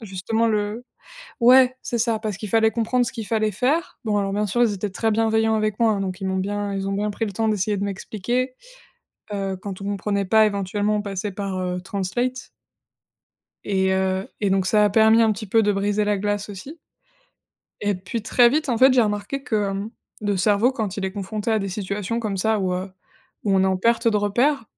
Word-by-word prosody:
justement 220 +3 -1
le 210 +2 -2 0.6
ouais 255 +1 +6
c'est 235 - -3
ça, 230 -1 +1
parce 215 -2 -4
qu'il 210 - -6
fallait 220 +1 +3
comprendre 245 +2 +1
ce - - -4
qu'il 225 -5 -6
fallait 215 -1 +1
faire. 265 - -1
Bon, 210 -1 +1
alors, 195 -1 -1
bien 210 0 0
sûr, 240 +5 0
ils 225 -3 +2
étaient 200 +1 -3
très 225 +3 -1
bienveillants 220 0 +2
avec 215 0 -1
moi, 220 -3 +3
donc 190 0 -4
ils 190 - -2
m'ont 190 0 -1
bien 205 +1 -2
ils 195 0 -3
ont 195 - -1
bien 210 +1 -1
pris 225 +2 -2
le 200 - -5
temps 225 +3 0
d'essayer 210 0 0
de 200 - -2
m'expliquer. 230 +6 -3 0.8
Heu, 195 -1 -2
quand 195 0 -7
on - - -6
comprenait 200 0 -1
pas, 220 +3 +5
éventuellement, 205 +1 -1
on 210 - -1
passait 200 0 -4
par, 195 -1 -4
heu, 180 0 -2
Translate 240 +8 -3 1.2
et 190 -1 +1
heu 190 0 0
et 200 -2 +1
donc 190 -1 +1
ça 210 +2 +4
a 205 - +3
permis 220 +2 +5
un 220 -1 +3
petit 215 +1 -7
peu 225 +4 +3
de 205 -1 +2
briser 205 +1 0
la 210 0 +1
glace, 205 +1 -2
aussi 210 - -9 1.0
et 205 0 0
puis, 205 +5 -5
très 240 +2 +5
vite, 300 +3 0
en 240 - +1
fait, 260 +2 +7
j'ai 255 -2 +5
remarqué 210 +6 -2
que, 210 -7 0
hem, 200 +2 -4 0.3
le 205 -2 0
cerveau, 210 +6 +3
quand 215 -6 -3
il 195 - -3
est 190 - -2
confronté 205 +2 -4
à 220 - +2
des 195 - -3
situations 200 +3 -3
comme 210 -4 -2
ça, 220 +3 +1
où, 185 -2 -1
heu, 185 +2 -4 0.5
où 200 -2 +2
on 190 - +4
est - - +3
en 190 0 +1
perte 230 +4 +2
de 215 - +2
repères, 235 +6 +1
210 Hz, 225 wpm, -23 LUFS, 195-225 Hz, 1.2 s, fait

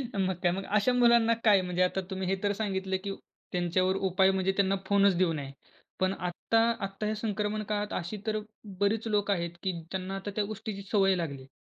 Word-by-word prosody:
मग 190 -2 +1
काय 175 - +4
मग 190 +2 -3
अशा 210 +5 +2
मुलांना 235 -2 +5
काय 205 -4 +6
म्हणजे 180 0 -2
आता 185 +1 0
तुम्ही 190 -1 -3
हे 195 - +2
तर 205 - +2
सांगितलं, 190 -2 -2
की 200 - -3 0.4
त्यांच्यावर 185 +1 +1
उपाय 190 0 +3
म्हणजे 190 0 +1
त्यांना 195 0 +3
फोनच 200 -1 +4
देऊ 175 -2 +2
नये. 140 -3 -5 0.5
पण 185 0 +2
आत्ता, 180 +5 0 0.2
आत्ता 195 +2 -4
ह्या 215 - 0
संक्रमण 210 0 -2
काळात 210 0 -1
अशी 180 +4 -3
तर 215 0 +1 0.4
बरीच 215 +3 +1
लोकं 205 -1 +2
आहेत, 170 -2 -2
की 190 - +1 0.2
त्यांना 190 0 -3
आता 195 +1 -5
त्या 210 - +1
गोष्टीची 210 -1 -6
सवय 195 -2 +4
लागली 150 -6 -4
आहे. 130 - -14
195 Hz, 200 wpm, -29 LUFS, 185-210 Hz, 0.5 s, काय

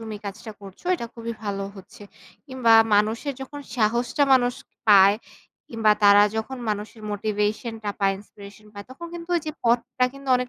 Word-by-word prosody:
তুমি 220 -1 -6
কাজটা 205 +2 -7
করছো 195 - -13
এটা 235 -9 -5
খুবই 230 0 -5
ভালো 200 -1 -3
হচ্ছে। 195 +2 -14 0.4
কিংবা 260 -4 +2 0.2
মানুষের 220 +7 +1
যখন 290 +2 -8
সাহসটা 240 +4 +1
মানুষ 245 -1 +3 0.3
পায় 200 0 +7 0.5
কিংবা 225 -2 +3
তারা 205 0 +7
যখন 220 +4 -4
মানুষের 210 +1 -4
motivation 210 +2 -2
টা 205 - -1
পায়, 195 0 +2
inspiration 205 +1 -14
পায়, 205 -1 -9
তখন 340 +6 -9
কিন্তু 340 0 -8
ওই 340 - 0
যে - - -1
পথটা 240 +1 +1
কিন্তু 275 -1 -11
অনেক 250 0 -3
220 Hz, 165 wpm, -24 LUFS, 205-250 Hz, 0.5 s, পায়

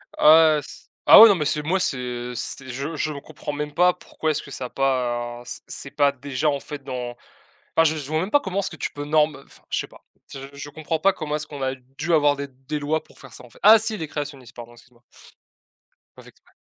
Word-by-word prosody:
Ah 155 0 +7
ouais - - 0
s 145 - -11 0.2
ah - - +12
ouais, 225 - +11
non 200 - +5
mais 150 - -2
c'est 150 +1 0
moi 180 +6 0
c'est 125 -5 -3
c'est 130 +3 -5
je 140 +6 -4
je 155 0 -2
comprends 150 +1 -7
même 150 0 -4
pas 180 +2 +4
pourquoi, 160 -2 -3
est-ce 150 - -2
que 140 - -12
ça 130 - -5
a - - -7
pas 120 -3 -1
c' 120 - -7
c'est 140 - -6
pas 145 -1 +3
déjà 140 +2 -2
en 140 - -1
fait 145 0 -9
dans 125 -2 -5 0.6
enfin 165 - +5
je 160 -1 +2
vois 155 0 0
même 185 +5 -3
pas 290 - +5
comment 190 -6 -3
est-ce 200 - -2
que - - -8
tu - - -3
peux 145 0 -6
norme 150 0 +2
enfin - - -19
je - - -1
sais - - -4
pas. - - -19 0.3
Je 135 0 -8
je 140 +1 -8
comprends 160 +2 -3
pas 195 +3 +3
comment 150 -3 -4
est-ce 150 - -4
qu'on 145 -2 -9
a 130 0 -1
dû 135 +6 -5
avoir 145 -2 +4
des 140 0 -5
des 135 +3 -6
lois 155 +2 -1
pour - - -20
faire 135 -4 -13
ça, - - -11
en 125 - -17
fait! - - -20
Ah 215 +2 +9
si, 220 0 -1
les 160 - -5
créationnistes, 140 -4 -7
pardon, 120 -1 -10
excuse-moi. 120 0 -21 1.1
Pas - - -14
fait - - -15
exprès. - - -27
145 Hz, 255 wpm, -23 LUFS, 130-155 Hz, 1.1 s, ah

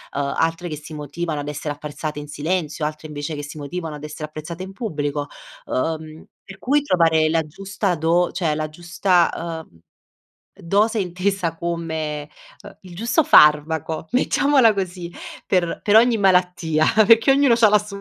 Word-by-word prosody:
uhm, 140 0 -1
altre 165 +2 -1
che 155 - -5
si 155 +2 -11
motivano 150 +1 -4
ad 145 - -5
essere 150 0 -4
apprezzate 150 +1 -6
in 145 - -8
silenzio, 155 0 -2
altre 155 +1 -5
invece 145 +1 -5
che 145 - -6
si 150 +2 -9
motivano 155 +2 -5
ad 150 0 -8
essere 150 0 -6
apprezzate 160 +4 -7
in 190 - -8
pubblico, 145 -9 -3 0.4
uhm, 155 +3 -3 0.2
per 195 -1 -11
cui 285 +7 +2
trovare 165 - +3
la 165 +1 +2
giusta 195 +4 -3
do 170 +2 +1
cioè 160 -4 -1
la 155 0 -3
giusta, 170 0 0
uhm, 85 - -24 0.7
dose 210 +6 +1
intesa 185 -2 -1
come, 160 -3 -4 0.3
uhm, - - -12
il 185 -2 -13
giusto 235 - +1
farmaco, 155 - +4
mettiamola 260 -1 +3
così 180 -3 -4 0.4
per 175 -3 0
per 205 - +3
ogni 235 0 +4
malattia, 180 -5 +2 0.2
perché 230 +3 +6
ognuno 270 -3 +4
c'ha 230 -2 +5
la 210 0 +5
sua. 200 -1 -8
165 Hz, 165 wpm, -21 LUFS, 150-190 Hz, 0.7 s, perché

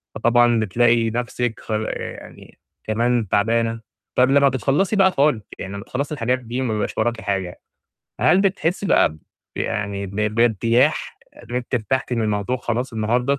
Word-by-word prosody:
فطبعًا 120 -1 +3
بتلاقي 115 +2 +2
نفسِك 120 0 -2
خ - - -9
يعني 110 0 -5 0.2
كمان 115 0 0
تعبانة، 115 +2 +1 0.3
طَب 125 +1 +4
لمّا 140 0 +5
بتخلّصي 140 - 0
بقى 190 -1 +5
خالص، 140 - +2 0.2
يعني 95 +1 -6
لمّا 100 - -6
تخلصي 140 +3 -4
الحاجات 125 -1 0
دي، 125 +2 -4
وما 120 -4 -1
بيبقاش 105 - -3
وراكِ 115 0 0
حاجة، 95 -3 -3 0.6
هل 190 - +4
بتحسي 195 -1 0
بقى - - +4
ب 80 - -14 0.4
يعني 100 -1 -2
ب 100 +2 -9
ب 105 0 0
بارتياح 115 +1 +2 0.3
إن - - -5
أنتِ 125 0 -3
أرتحتِ 125 +3 -1
من 115 -2 0
الموضوع 105 +3 -1
خلاص 120 +1 -3
النهارده؟ 120 +5 0
120 Hz, 160 wpm, -21 LUFS, 110-130 Hz, 0.6 s, لمّا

